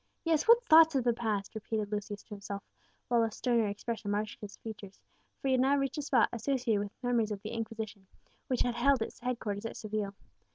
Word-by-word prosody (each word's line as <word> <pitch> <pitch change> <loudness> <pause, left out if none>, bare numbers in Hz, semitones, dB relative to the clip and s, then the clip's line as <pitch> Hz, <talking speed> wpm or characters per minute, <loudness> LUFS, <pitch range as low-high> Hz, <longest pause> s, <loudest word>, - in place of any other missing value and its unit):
Yes, 320 0 +2
what 475 +1 +7
thoughts 320 - +7
of 260 - +2
the 240 -1 +3
past!" 215 -4 -2
repeated 215 -1 -3
Lucius 205 -1 -4
to - - -33
himself, 200 -1 -6 0.4
while 240 -1 +3
a 225 - +2
sterner 230 0 +1
expression 205 +1 -4
marked 205 +1 -1
his 205 -1 -8
features; 205 -3 -9 0.4
for 270 - -1
he - - +3
had 255 -1 +4
now 275 +2 +4
reached 275 +1 -1
a - - 0
spot 260 -6 +3
associated 240 -2 0
with 205 +5 -6
memories 240 -3 +2
of 200 -1 -5
the 215 - -4
Inquisition, 220 -3 -5 0.4
which 255 - 0
had 245 - +1
held 250 0 +3
its - - -8
headquarters 225 -4 -3
at - - -8
Seville. 210 -2 -3
225 Hz, 210 wpm, -31 LUFS, 205-255 Hz, 0.4 s, what